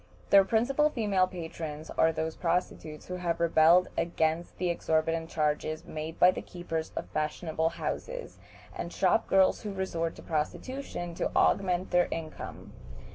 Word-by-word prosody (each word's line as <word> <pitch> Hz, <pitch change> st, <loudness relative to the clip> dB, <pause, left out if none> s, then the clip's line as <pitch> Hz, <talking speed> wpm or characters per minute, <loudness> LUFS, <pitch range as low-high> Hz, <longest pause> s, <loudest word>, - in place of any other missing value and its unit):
Their 195 Hz, -1 st, +8 dB
principal 255 Hz, +9 st, +2 dB
female 205 Hz, -8 st, +1 dB
patrons 160 Hz, -3 st, -6 dB
are 160 Hz, -, +3 dB
those 160 Hz, 0 st, -3 dB
prostitutes 165 Hz, -3 st, -2 dB
who 180 Hz, -, -5 dB
have 170 Hz, -2 st, -1 dB
rebelled 170 Hz, +2 st, +5 dB
against 165 Hz, 0 st, -1 dB
the 180 Hz, -1 st, 0 dB
exorbitant 165 Hz, 0 st, 0 dB
charges 155 Hz, 0 st, -1 dB
made 155 Hz, +1 st, -6 dB
by 180 Hz, -, +7 dB
keepers 165 Hz, -3 st, -5 dB
of -, -, -3 dB
fashionable 160 Hz, +1 st, -1 dB
houses, -, -, -5 dB, 0.4 s
and -, -, -5 dB
shop -, -, +2 dB
girls 190 Hz, -1 st, +4 dB
who 210 Hz, -, -4 dB
resort 170 Hz, -4 st, -2 dB
to -, -, -12 dB
prostitution 175 Hz, -, -3 dB
to -, -, -1 dB
augment 185 Hz, -1 st, +2 dB
their 175 Hz, 0 st, +4 dB
income. 160 Hz, -1 st, -7 dB
170 Hz, 140 wpm, -29 LUFS, 160-185 Hz, 0.4 s, Their